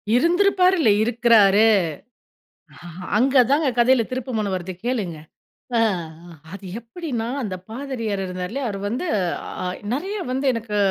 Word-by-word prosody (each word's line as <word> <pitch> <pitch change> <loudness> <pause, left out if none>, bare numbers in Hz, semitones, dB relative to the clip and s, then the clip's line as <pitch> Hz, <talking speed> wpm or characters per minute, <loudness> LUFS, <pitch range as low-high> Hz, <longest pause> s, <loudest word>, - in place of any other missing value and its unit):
இருந்திருப்பாருல்ல 360 - +3
இருக்கிறாரு. 225 -3 +4 1.5
அங்கதாங்க 270 +3 +3
கதையில 245 0 +4
திருப்புமொன 235 -5 -2
வருது 185 +1 -5
கேளுங்க. 205 -10 -2 0.6
ஆ - - +4 0.7
அது 195 0 -9
எப்படின்னா 240 -2 -5 0.2
"அந்த 190 -3 -3
பாதிரியார் 230 -5 -4
இருந்தார்ல 185 +7 -4
அவரு 200 -2 -4
வந்து 245 - -3 0.6
அ - - -3 0.3
நிறைய 385 +10 -3
வந்து 265 +2 -2
எனக்கு 220 -2 -3
235 Hz, 105 wpm, -22 LUFS, 210-275 Hz, 1.5 s, இருக்கிறாரு